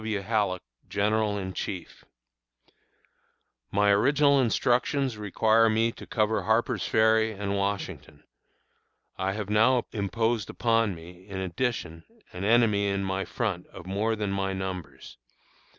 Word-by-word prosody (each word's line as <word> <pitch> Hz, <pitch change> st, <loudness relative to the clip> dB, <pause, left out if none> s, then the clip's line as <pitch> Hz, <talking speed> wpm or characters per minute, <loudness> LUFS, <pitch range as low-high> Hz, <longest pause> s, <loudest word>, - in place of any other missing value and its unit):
W. 110 Hz, -2 st, -2 dB
Halleck, 100 Hz, -3 st, 0 dB, 0.3 s
General 105 Hz, 0 st, +1 dB
in 95 Hz, -1 st, -4 dB
Chief_: 90 Hz, -3 st, -6 dB, 1.7 s
My 100 Hz, 0 st, +3 dB
original 140 Hz, +6 st, +4 dB
instructions 125 Hz, +2 st, +1 dB
require 110 Hz, +2 st, +3 dB
me 110 Hz, +1 st, +2 dB
to -, -, -12 dB
cover 110 Hz, -1 st, +1 dB
Harper's 110 Hz, +2 st, 0 dB
Ferry 110 Hz, 0 st, +3 dB
and 100 Hz, 0 st, -3 dB
Washington. 100 Hz, -6 st, -4 dB, 1.0 s
I 95 Hz, +1 st, 0 dB
have 105 Hz, -1 st, -4 dB
now 115 Hz, +3 st, +4 dB
imposed 110 Hz, +1 st, -1 dB
upon 115 Hz, -4 st, +1 dB
me, 90 Hz, +3 st, -13 dB
in 95 Hz, -2 st, -6 dB
addition, 90 Hz, -3 st, -3 dB, 0.3 s
an 90 Hz, -, -6 dB
enemy 105 Hz, -2 st, +3 dB
in 100 Hz, 0 st, -1 dB
my 95 Hz, 0 st, -2 dB
front 100 Hz, -7 st, -3 dB
of 90 Hz, -, -12 dB
more 105 Hz, +4 st, 0 dB
than 105 Hz, -2 st, -2 dB
my 95 Hz, 0 st, -1 dB
numbers. 95 Hz, -7 st, -6 dB
105 Hz, 130 wpm, -27 LUFS, 95-115 Hz, 1.7 s, original